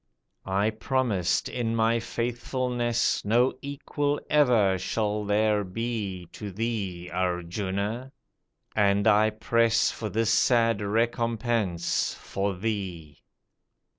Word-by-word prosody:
I 100 +3 +1
promised 110 -5 0
in 115 -2 -2
my 115 +1 +2
faithfulness 120 +1 -1
No 120 +5 +3
equal 145 +1 -2
ever 115 -10 +4
shall 105 +2 -1
there 105 0 +2
be 100 -3 -4
To 105 -2 -7
thee, 95 -5 -3
Arjuna, 95 +7 -2 0.6
and 100 -1 +3
I 110 0 +5
press 115 +1 +2
For 110 - -5
this 110 +1 +1
sad 115 -2 +3
recompense 115 -3 0
for 100 0 -3
thee." 90 -7 -4
110 Hz, 100 wpm, -27 LUFS, 100-115 Hz, 0.6 s, I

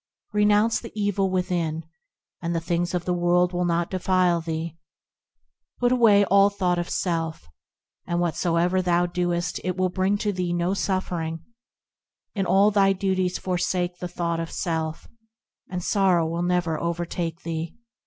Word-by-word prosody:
Renounce 210 +2 +3
the 230 - -9
evil 200 -1 +1
within, 175 -3 -1 0.6
and 170 0 -2
the - - +1
things 170 +1 -1
of 175 -1 -2
the 180 - 0
world 175 +1 +2
will 180 0 0
not 170 0 0
defile 185 -2 +2
thee; 165 0 -4 1.0
Put 245 0 +2
away 220 -5 +5
all 200 +1 +5
thought 180 -3 0
of 175 - -3
self, 165 - -2 0.6
and 175 0 0
whatsoever 175 +1 +1
thou 175 -1 +2
doest 175 0 -1
it 185 0 -2
will 185 0 +1
bring 190 +2 +1
to 205 0 -1
thee 180 -2 -2
no 175 +2 0
suffering; 170 -5 -2 0.9
In 195 -3 -1
all 200 +2 +5
thy 195 -1 +4
duties 185 -1 0
forsake 180 -1 -1
the 180 - -4
thought 170 -1 -2
of 165 0 -4
self, 160 -2 -3 0.6
and 180 -1 -4
sorrow 185 -5 +3
will 165 +1 -2
never 175 -3 0
overtake 170 -1 -3
thee. 165 0 -4
180 Hz, 155 wpm, -24 LUFS, 170-190 Hz, 1.0 s, away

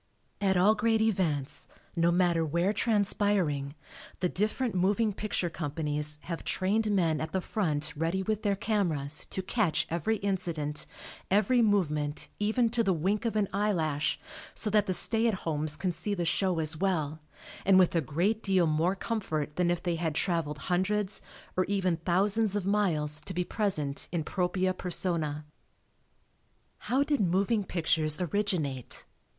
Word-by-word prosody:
At 190 -2 +2
all 195 +4 +5
great 225 -1 +2
events, 175 -11 0 0.3
no 170 0 +3
matter 175 -2 +2
where 170 +6 +1
transpiring, 200 -9 +1 0.4
the 180 - +1
different 215 +6 -1
moving 205 +4 +2
picture 205 -3 -2
companies 150 -2 -3
have 170 -2 -5
trained 210 +4 +1
men 165 -7 +2
at 155 0 -4
the 190 - +1
front 155 -6 -1
ready 165 +5 -1
with 215 +1 -1
their 200 -1 +1
cameras 165 -9 -1
to 190 - -3
"catch" 190 -5 +1
every 175 +7 0
incident, 170 -7 -2 0.4
every 225 +5 +3
movement 155 -9 +1
even 220 +3 +2
to 235 0 +2
the 195 - +2
wink 195 +8 0
of 225 - -1
an 210 -2 +2
eyelash, 165 -8 0 0.4
so 210 - +1
that 210 -1 +3
the 185 - +1
"stay 225 +4 +2
at 220 - +1
homes" 155 -1 0
can 185 +2 -1
see 175 +5 -3
the 175 -2 -2
show 185 +1 +1
as 160 -1 +1
well, 160 -4 -1 0.4
and 190 -1 +5
with 185 -2 +5
a 165 - +3
great 175 - 0
deal 190 -4 +3
more 160 +4 +1
comfort 160 -9 -3
than 180 -1 +2
if 175 -1 -1
they 175 -2 0
had 160 -2 -2
traveled 165 -4 0
hundreds, 190 +2 0 0.3
or 185 - +3
even 185 -3 0
thousands, 195 +5 +1
of 205 -3 -1
miles 160 -7 +1
to 185 - -7
be 180 - +1
present 155 -9 -1
in 170 -2 -1
propria 185 +2 0
persona. 165 -5 -1 1.3
How 265 +3 +1
did 290 -1 0
moving 200 +4 +2
pictures 160 -3 0
originate? 175 - -2
185 Hz, 155 wpm, -29 LUFS, 160-205 Hz, 1.3 s, all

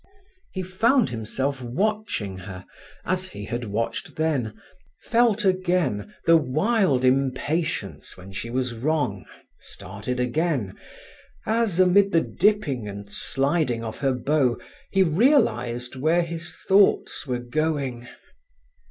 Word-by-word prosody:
He 190 - -4
found 225 - +2
himself 130 +4 -2
watching 125 - -2
her 95 -1 -9 0.4
as 185 +1 0
he 105 - -8
had 120 +3 -4
watched 110 +2 -3
then, 140 -9 -1 0.4
felt 230 -3 +2
again 180 - +1
the 165 0 +7
wild 155 - +1
impatience 130 - -1
when 95 +1 -11
she 105 +4 -5
was 125 0 -1
wrong, 125 -5 -1 0.3
started 105 +7 -6
again 125 - 0 0.7
as, 220 -5 +1
amid 195 +1 +5
the 165 - +5
dipping 170 - +1
and 100 0 -8
sliding 135 -3 0
of 110 -1 -6
her 135 -2 +1
bow, 125 -2 +1 0.3
he 195 -1 +4
realized 125 - +2
where 160 +6 +2
his 170 0 -6
thoughts 195 -6 +3
were 125 -1 -1
going. 130 -1 -2
140 Hz, 115 wpm, -24 LUFS, 120-185 Hz, 0.7 s, the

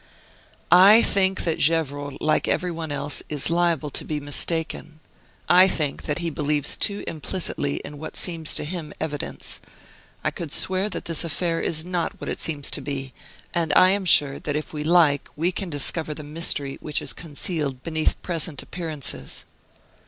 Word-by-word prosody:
"I 195 +6 +8
think 190 -1 +2
that 165 -2 -1
Gevrol, 145 -3 +1
like 155 0 +1
every 180 -1 0
one 165 -2 -5
else, 145 0 -1
is 150 +1 +1
liable 170 -4 +1
to - - -2
be 150 -1 -3
mistaken. 155 +2 -2 0.5
I 180 +2 +7
think 150 -6 -2
that 150 - 0
he 170 -1 -2
believes 150 -1 +1
too 205 -1 0
implicitly 150 - -2
in 145 - -9
what 160 - -7
seems 165 -3 0
to - - +5
him 165 -1 -5
evidence. 150 -2 -3 0.6
I - - +1
could 165 -4 -6
swear 190 +5 +1
that - - -5
this 165 0 +1
affair 165 +1 -1
is 160 0 -1
not 180 -2 -2
what - - -4
it - - -4
seems 145 -3 0
to - - +3
be; 135 -2 -4 0.4
and 165 -3 0
I 185 - +7
am 200 -1 0
sure 145 -5 +4
that 145 - -3
if 150 +1 -4
we 150 -1 -3
like 155 -3 +3
we 170 +4 +1
can 190 0 -4
discover 155 +1 +1
the 155 - -7
mystery 145 -2 -1
which 150 -1 -1
is - - -3
concealed 150 -4 -3
beneath 160 -1 0
present 165 -4 -3
appearances." 160 -6 -5
160 Hz, 175 wpm, -24 LUFS, 145-175 Hz, 0.6 s, I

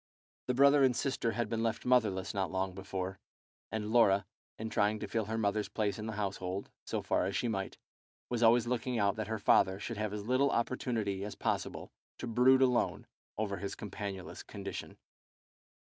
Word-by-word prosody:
The 125 - +1
brother 140 +1 +6
and 130 -2 +4
sister 120 -4 0
had 120 0 -1
been 115 0 -2
left 115 -1 -1
motherless 110 -7 +2
not 95 -2 -1
long 95 0 -1
before, 95 0 -5 0.5
and 110 -1 -3
Laura, 100 -4 +5 0.3
in 110 0 -5
trying 105 +1 +2
to - - -5
fill 110 -2 -1
her 110 +2 -3
mother's 105 -1 0
place 105 -1 -1
in 105 - -4
the 110 - -3
household, 100 -2 -3
so - - -2
far - - +1
as 100 - -3
she 120 - 0
might, 95 -4 -3 0.5
was 120 -1 -2
always 115 0 +5
looking 125 0 -1
out 100 -2 +2
that 110 -2 -3
her 110 0 -2
father 95 -1 +4
should 115 +2 -5
have 110 -1 -1
as 105 -1 -5
little 130 +4 +3
opportunity 115 -6 -1
as 105 - -5
possible - - -2 0.3
to - - -5
brood 125 +3 +5
alone 125 -2 +1 0.3
over 100 -2 -1
his 100 +2 -4
companionless 100 -2 -6
condition. - - -7
110 Hz, 185 wpm, -32 LUFS, 100-120 Hz, 0.5 s, brother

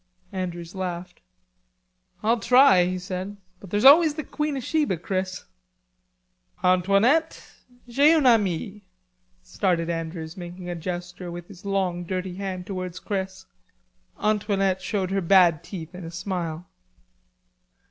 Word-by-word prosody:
Andrews 175 -3 -5
laughed. 180 -2 -5 1.0
"I'll 230 +2 +2
try," 250 -5 +6
he 185 +1 -2
said. 185 +2 -5 0.2
"But 195 - -12
there's 205 +6 0
always 305 +2 +8
the 310 - -4
Queen 300 0 -3
of 260 - -5
Sheba, 295 - 0
Chris." 185 +2 -3 1.2
"Antoinette, 200 - +3 0.4
j'ai 280 +6 +5
un 305 -4 +2
ami," 210 -3 +2 0.6
started 170 - 0
Andrews, 165 0 -5
making 175 -1 -8
a - - -4
gesture 175 +1 -6
with 175 +2 -8
a 200 +1 -9
long 185 -3 0
dirty 185 +1 -4
hand 185 -1 -5
towards 185 -2 -5
Chris. 190 -2 -4 0.7
Antoinette 200 -3 +1
showed 190 -1 -2
her 195 0 0
bad 175 -3 +4
teeth 170 -2 -8
in 180 0 -8
a 165 - -6
smile. 175 -1 -4
185 Hz, 125 wpm, -25 LUFS, 175-205 Hz, 1.2 s, always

